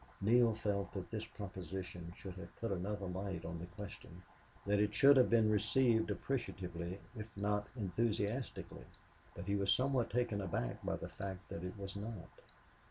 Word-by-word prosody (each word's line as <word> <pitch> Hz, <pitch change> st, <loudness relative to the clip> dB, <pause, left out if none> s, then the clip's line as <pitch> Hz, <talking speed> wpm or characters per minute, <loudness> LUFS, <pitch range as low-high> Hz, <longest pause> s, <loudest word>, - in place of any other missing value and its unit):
Neale 115 Hz, +2 st, +5 dB
felt 100 Hz, -3 st, -1 dB
that 95 Hz, -2 st, -5 dB
this 110 Hz, -1 st, -2 dB
proposition 95 Hz, -4 st, -6 dB
should 95 Hz, -, -7 dB
have 95 Hz, -, -9 dB
put 115 Hz, -2 st, -2 dB
another 100 Hz, +2 st, -2 dB
light 95 Hz, +1 st, -3 dB
on 85 Hz, 0 st, -4 dB
the 85 Hz, -, -6 dB
question, 90 Hz, -1 st, -9 dB, 0.4 s
that 100 Hz, 0 st, +3 dB
it 105 Hz, 0 st, +2 dB
should 140 Hz, +6 st, +8 dB
have 130 Hz, -2 st, +6 dB
been 115 Hz, -2 st, +5 dB
received 110 Hz, +2 st, +4 dB
appreciatively 90 Hz, -8 st, -2 dB, 0.2 s
if 110 Hz, -1 st, -5 dB
not 105 Hz, 0 st, +1 dB
enthusiastically. 110 Hz, +3 st, -1 dB, 0.5 s
But 85 Hz, -, -6 dB
he 100 Hz, +1 st, +1 dB
was 100 Hz, 0 st, +3 dB
somewhat 130 Hz, -1 st, +3 dB
taken 120 Hz, -4 st, +1 dB
aback -, -, -2 dB
by -, -, 0 dB
the -, -, -5 dB
fact 95 Hz, -2 st, -6 dB
that 85 Hz, -, -5 dB
it 90 Hz, +2 st, -5 dB
was 100 Hz, -1 st, -6 dB
not. 105 Hz, -2 st, -5 dB
100 Hz, 165 wpm, -37 LUFS, 95-110 Hz, 0.5 s, should